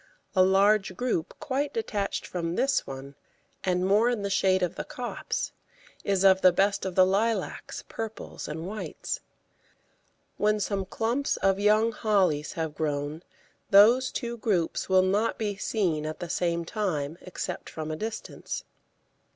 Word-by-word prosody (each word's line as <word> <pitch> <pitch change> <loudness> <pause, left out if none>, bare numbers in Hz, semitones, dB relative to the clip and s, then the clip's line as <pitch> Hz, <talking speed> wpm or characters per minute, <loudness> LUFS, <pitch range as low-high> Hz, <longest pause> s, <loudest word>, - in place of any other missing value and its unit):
A 185 - +6
large 195 0 +4
group, 240 -10 -1
quite 280 - -2
detached 210 - -2
from 170 -1 -3
this 270 +5 +1
one, 135 +1 -7 0.5
and 180 -1 +1
more 210 +5 +4
in 235 -4 -1
the 200 - -2
shade 190 -1 +3
of 175 - 0
the - - -5
copse, 245 -1 -4 0.5
is 195 -1 +1
of 190 -1 +6
the 185 - +7
best 195 +3 +1
of 185 -2 -3
the 185 - +7
lilacs, 215 +4 -1
purples, 220 -1 -6
and 160 +2 -5
whites. 210 +3 -4 1.2
When 210 0 +2
some 195 -1 -1
clumps 235 +8 -1
of 195 0 +2
young 215 +2 +4
hollies 190 -9 +1
have 160 -2 -3
grown, 150 0 -2 0.5
those 235 +6 +6
two 235 -2 -4
groups 195 -8 0
will 185 0 +5
not 205 +4 +1
be 210 -2 -2
seen 175 -7 -1
at 155 - -5
the 175 - -5
same 170 -1 0
time, 165 -6 -2
except 180 0 -5
from 155 -1 -5
a - - -2
distance. 220 +7 -5
195 Hz, 150 wpm, -27 LUFS, 170-215 Hz, 1.2 s, the